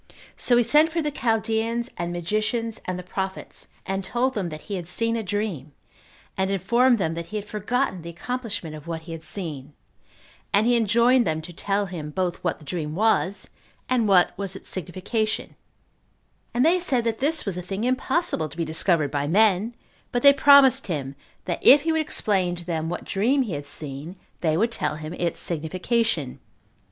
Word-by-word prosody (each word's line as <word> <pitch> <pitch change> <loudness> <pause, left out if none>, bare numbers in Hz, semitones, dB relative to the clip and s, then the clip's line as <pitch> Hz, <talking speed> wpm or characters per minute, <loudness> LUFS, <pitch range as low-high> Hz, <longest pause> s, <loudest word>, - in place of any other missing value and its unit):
So 245 - +2
he 240 - +5
sent 305 +6 +4
for 335 - -1
the 300 -2 -1
Chaldeans 230 0 0
and 175 0 -3
magicians, 215 +6 -2
and 185 -1 -3
the 180 - -6
prophets, 190 +1 -5 0.2
and 195 0 -2
told 250 +6 0
them 195 -6 -2
that 155 -1 -8
he 205 - -7
had 175 -3 -5
seen 230 +5 0
a 230 - -1
dream, 195 -9 -3 0.6
and 190 0 0
informed 235 +6 +3
them 165 -5 -1
that 170 0 -5
he 215 - -8
had 210 -1 -3
forgotten 210 -1 -1
the 170 - -8
accomplishment 205 -3 -5
of 150 +1 -11
what 165 -1 -4
he 165 +1 -10
had 165 -1 -7
seen, 155 -5 -6 0.8
and 205 +2 +4
he 240 0 +4
enjoined 235 +2 +4
them 160 0 0
to 175 - -9
tell 200 +4 0
him 170 -5 -6
both 180 +2 -1
what - - 0
the 155 - -16
dream 155 -1 -4
was, 200 -2 +1 0.4
and 245 -4 +2
what 185 -3 +4
was 195 -1 -2
its - - -11
signification; 190 +5 -2 1.0
and 245 +4 +2
they 350 +3 +4
said 270 -9 0
that 230 -1 -1
this 305 +3 0
was 195 -4 -2
a 180 - -4
thing 195 +4 -4
impossible 255 - 0
to 145 - -13
be 165 - -1
discovered 160 -1 +1
by 145 0 -1
men; 210 +5 +3 0.4
but 245 - -1
they 280 0 +9
promised 280 -2 +6
him, 140 -6 -3 0.3
that 175 - -2
if 280 +2 +7
he 325 - +1
would 320 0 +2
explain 190 -11 0
to 175 0 -6
them 165 -2 -2
what 175 - -4
dream 250 +8 +2
he 215 -8 -5
had 145 0 -5
seen, 150 +4 -7 0.2
they 160 -2 +1
would 225 +5 +2
tell 150 -9 -1
him 155 +1 -7
its 175 -1 -2
signification. 175 - -1
195 Hz, 195 wpm, -24 LUFS, 170-235 Hz, 1.0 s, they